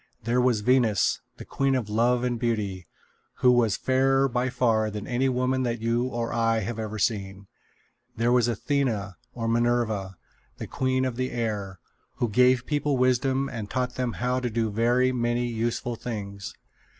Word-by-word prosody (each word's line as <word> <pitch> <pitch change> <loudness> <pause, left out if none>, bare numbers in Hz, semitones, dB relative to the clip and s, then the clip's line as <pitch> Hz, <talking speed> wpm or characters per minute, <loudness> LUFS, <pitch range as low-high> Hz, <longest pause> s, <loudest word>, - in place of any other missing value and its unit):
There 120 +3 +1
was 125 -4 +2
Venus, 115 -4 +2 0.2
the - - -9
queen 135 -1 0
of 125 -5 -1
love 120 +3 +2
and 120 -2 -1
beauty, 105 -7 -2 0.5
who 125 - +4
was 120 -5 +2
fairer 135 +1 +2
by 125 0 -1
far 110 -4 +1
than 105 0 -6
any 130 +2 0
woman 130 +1 0
that 120 -2 -1
you 115 +2 0
or 120 -2 -3
I 115 -1 +1
have 115 +3 -4
ever 110 -1 -4
seen. 100 -2 -2 0.7
There 115 +1 +2
was 120 -1 +4
Athena, 115 -5 -1 0.2
or 115 -2 -3
Minerva, 115 -5 0 0.4
the - - -5
queen 130 0 0
of 125 -2 -3
the 130 0 -1
air, 105 -6 -3 0.4
who 120 - -1
gave 125 +3 +3
people 145 -2 0
wisdom 130 +2 +2
and 110 -6 -6
taught 125 +1 -2
them 125 -2 -2
how 125 +1 -1
to 125 -1 -2
do 110 -1 -1
very 120 +4 +2
many 120 -1 0
useful 120 +1 -2
things. 100 -4 -6
120 Hz, 170 wpm, -26 LUFS, 110-125 Hz, 0.7 s, who